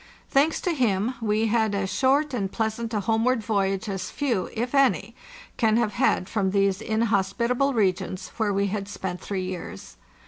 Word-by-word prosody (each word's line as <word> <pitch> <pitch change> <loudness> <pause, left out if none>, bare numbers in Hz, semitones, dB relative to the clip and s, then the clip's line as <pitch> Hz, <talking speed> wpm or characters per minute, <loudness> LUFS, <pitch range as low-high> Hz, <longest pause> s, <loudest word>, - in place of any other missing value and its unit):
Thanks 290 +4 +3
to 355 - 0
him, 230 -4 +1
we 215 0 +1
had 220 -2 +1
as 200 0 -2
short 275 +6 +2
and 200 -5 -2
pleasant 225 0 -2
a 210 -2 0
home 225 +3 +1
ward 250 -2 +1
voyage 200 -1 0
as 190 -2 -3
few, 240 -10 -1
if 240 +4 -3
any, 235 - +2 0.4
can 225 -2 +3
have 235 -3 +1
had 245 -7 +1
from 200 -3 0
these 195 0 +1
in 220 0 -1
hospitable 235 +6 +1
regions, 185 -3 0
where 220 -3 +1
we 200 0 +1
had 200 0 -3
spent 190 -3 -5
three 190 -2 -3
years. 180 - -7
215 Hz, 180 wpm, -25 LUFS, 195-235 Hz, 0.4 s, Thanks